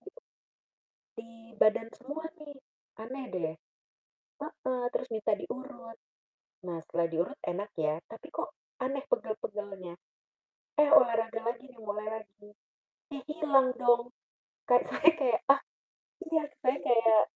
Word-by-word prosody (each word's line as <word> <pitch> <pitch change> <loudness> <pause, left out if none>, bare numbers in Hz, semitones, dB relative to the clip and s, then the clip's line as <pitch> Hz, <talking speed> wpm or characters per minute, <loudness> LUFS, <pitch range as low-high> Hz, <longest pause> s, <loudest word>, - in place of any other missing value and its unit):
di - - -11 1.0
di 230 0 -10 0.3
badan 225 +1 +4
semua 290 +5 -7 0.2
nih, 290 -2 -10 0.5
aneh 260 +3 -6
deh. 160 -3 -1 0.9
Heeh, 260 -4 -3
terus 255 - -1
minta 220 -2 -1
diurut. 245 -3 -7 0.7
Nah, 170 -2 -4
setelah 170 +1 0
diurut 175 - -1
enak, 200 +4 -2
ya, 155 0 0
tapi, 225 - -11
kok, - - -4 0.2
aneh 270 +1 -1
pegal-pegalnya. 205 - -3 0.8
Eh, 300 -1 +5
olahraga 225 -5 +5
lagi, 240 +3 -3
nih, 250 - -18
mulai 210 -1 -4
lagi, 210 0 -17 0.7
ih, 275 - -7
hilang 290 -4 +3
dong, 240 0 +4 0.5
kan 245 - +6
saya 330 - +5
kayak 250 -5 +2
ah 275 - +8 0.7
iya 320 -1 +4 0.2
saya 255 +2 +4
kayak 225 -2 +5
235 Hz, 125 wpm, -31 LUFS, 210-270 Hz, 1.0 s, ah